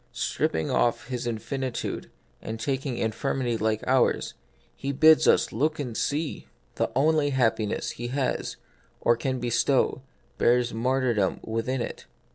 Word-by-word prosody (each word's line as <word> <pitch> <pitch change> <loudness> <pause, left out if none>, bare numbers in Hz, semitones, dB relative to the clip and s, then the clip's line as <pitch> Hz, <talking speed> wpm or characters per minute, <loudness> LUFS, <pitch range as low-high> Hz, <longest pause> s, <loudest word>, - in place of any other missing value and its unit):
Stripping 80 0 -1
off 120 +1 +1
His 125 -1 -3
in 115 -2 -1
finitude, 130 +1 -4 0.3
and 110 0 -5
taking 135 +1 -2
infirmity 120 +2 -1
like 110 0 0
ours, 130 -1 +2 0.4
He 140 - -3
bids 155 +3 +6
us - - +4
look 155 +7 0
and 125 -6 -4
see! 150 +5 -2 0.3
The - - 0
only 150 +2 +3
happiness 115 -5 0
He 120 - -5
has, 130 +1 -2 0.4
or 120 - +3
can 130 +2 -2
bestow, 120 +2 +1 0.4
bears 120 0 +3
martyrdom 120 -3 +1
within 115 +3 -2
it. - - -7
125 Hz, 135 wpm, -26 LUFS, 115-135 Hz, 0.4 s, bids